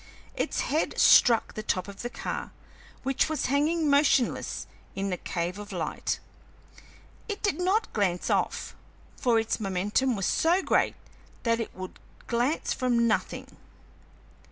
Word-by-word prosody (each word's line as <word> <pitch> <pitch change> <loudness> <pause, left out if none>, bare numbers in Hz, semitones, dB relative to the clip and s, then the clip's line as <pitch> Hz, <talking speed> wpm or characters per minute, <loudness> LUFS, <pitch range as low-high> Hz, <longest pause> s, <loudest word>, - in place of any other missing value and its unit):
Its - - -1
head 310 +2 -1
struck 235 -3 +6
the 215 - -4
top 185 -3 -1
of 200 0 -9
the 240 - -3
car, - - -4 0.5
which 270 +3 +1
was 315 - -1
hanging 310 +3 +2
motionless 280 -3 +2 0.3
in 195 0 -2
the 180 - -1
cave 175 +3 -3
of 205 0 -8
light; - - -2 1.1
it 415 - -4
did 380 -6 +1
not 390 +5 +1
glance 185 -4 0
off, - - -1 0.4
for 240 -2 +2
its 225 0 0
momentum 210 +6 0
was 195 -2 -2
so 350 +4 +2
great - - +2 0.5
that 230 -1 +2
it 230 - -5
would 185 0 -8 0.3
glance 245 +7 0
from 240 -2 +2
nothing. 220 - -2
235 Hz, 140 wpm, -28 LUFS, 200-290 Hz, 1.1 s, struck